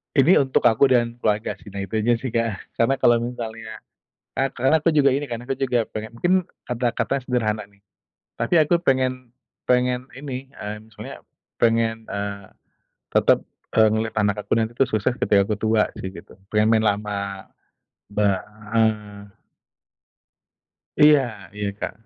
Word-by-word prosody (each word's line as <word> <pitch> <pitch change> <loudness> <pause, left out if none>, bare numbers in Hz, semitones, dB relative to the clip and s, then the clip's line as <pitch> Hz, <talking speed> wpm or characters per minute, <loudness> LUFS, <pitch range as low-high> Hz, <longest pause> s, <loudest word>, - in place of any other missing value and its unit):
ini 145 +7 +6
untuk 135 -2 +1
aku 115 +4 +5
dan 120 -2 +1
keluarga 105 0 0
sih, - - -19
nah 100 0 -5
itu 110 +2 -2
aja 120 +3 +3
sih 120 0 -5
Kak. 115 -4 -2
Karena 135 +4 +3
kalau 120 -1 +5
misalnya, 115 -2 -6 0.5
e 135 - +1
karena 130 +5 +2
aku 165 - +4
juga 145 -2 +4
ini 145 - -1
kan, 115 - -3
aku 135 - -1
juga 125 -4 0
pengen 110 0 -6
mungkin 175 +1 +2 0.3
kata-katanya 125 +2 -1
sederhana 110 -4 -1
nih. 100 - -27 0.6
Tapi 115 - -1
aku 155 +3 +3
pengen 130 -2 0 0.3
pengen 125 0 +2
ini, 135 -1 -7
mmm, 105 +2 -8
soalnya, - - -10 0.3
pengen, 115 -1 +1
eee, 100 -1 -4 0.6
tetap, - - +4 0.4
eee, 110 -1 +6
ngelihat 110 +1 -1
anak 105 0 +1
aku - - +2
nanti 115 0 0
tuh 135 - +4
sukses 110 +3 0
ketika 100 -1 +3
aku 105 +1 -2
tua 110 0 +2
sih 95 0 -6
gitu, 85 - -13 0.2
pengen 105 +1 +4
main 110 -1 +3
lama, 100 -2 -2 0.6
ba 100 -2 +1 0.3
heeh. 105 -2 0 1.7
Iya 135 -9 +4
iya, 105 -1 -2
Kak. - - -3
115 Hz, 155 wpm, -23 LUFS, 105-125 Hz, 1.7 s, ini